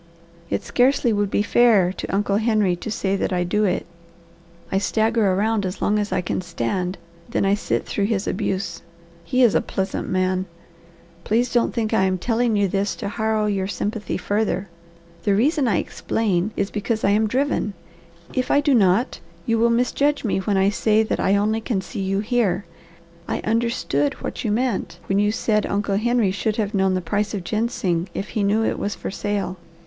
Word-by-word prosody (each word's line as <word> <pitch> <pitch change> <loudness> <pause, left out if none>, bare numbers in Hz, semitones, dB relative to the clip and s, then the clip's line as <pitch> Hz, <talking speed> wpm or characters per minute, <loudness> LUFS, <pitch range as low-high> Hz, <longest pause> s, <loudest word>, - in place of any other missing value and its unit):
It - - -1
scarcely 250 -2 +2
would 205 -1 0
be 205 - +1
fair 210 -6 +4
to - - -6
Uncle 200 0 +1
Henry 215 -4 +2
to 175 - -7
say 200 -2 -1
that - - -1
I 180 -1 +1
do 210 +4 +1
it. 185 - 0 0.9
I 195 - +2
stagger 220 -1 +2
around 210 +2 +1
as 185 0 -4
long 210 0 +1
as 205 -1 -2
I 185 -1 +1
can 180 - -2
stand, 180 +3 -2 0.3
then - - 0
I 195 - +3
sit 205 - -1
through 200 - -1
his 205 -2 0
abuse. 185 -3 -2 0.4
He 255 +9 +2
is 235 - +5
a - - +3
pleasant 190 0 -3
man. 185 0 0 0.8
Please 235 +3 +1
don't 240 -1 +2
think 225 -2 -2
I 190 -3 +3
am 185 0 +1
telling 230 +3 +1
you 205 -1 +3
this 195 +2 -1
to 200 - -4
harrow 220 0 0
your 195 -2 0
sympathy 205 +3 -3
further. 200 0 -1 0.5
The 200 -2 +2
reason 280 +5 +2
I 200 -7 +2
explain 200 -2 -1
is 200 0 -1
because 220 +1 -2
I 200 - +4
am 215 +2 +3
driven. 255 -4 0 0.6
If 255 - -1
I 285 - +4
do 290 -1 +2
not, 215 +2 +3 0.3
you 230 -1 +1
will 235 +1 +4
misjudge 265 +5 +1
me 210 -4 0
when 200 +1 0
I 190 +1 +4
say 215 +1 +2
that 220 - -2
I 195 - +3
only 215 +2 +1
can 220 -3 -1
see 190 +1 -6
you 195 +1 0
here. 215 -4 0 0.6
I - - -1
understood 215 - 0
what - - -5
you 220 - 0
meant 235 -1 -1
when 195 +1 +1
you 205 0 +3
said 215 -1 0
Uncle 200 0 0
Henry 235 -2 +2
should 215 +2 -1
have 215 -1 -1
known 190 -1 +2
the 185 - -1
price 205 +3 -1
of 190 - -4
ginseng 190 -4 -1
if 195 - -4
he 215 - -2
knew 205 +3 +2
it - - -1
was 205 - -2
for - - -5
sale. 200 -2 -2
205 Hz, 195 wpm, -22 LUFS, 190-225 Hz, 0.9 s, is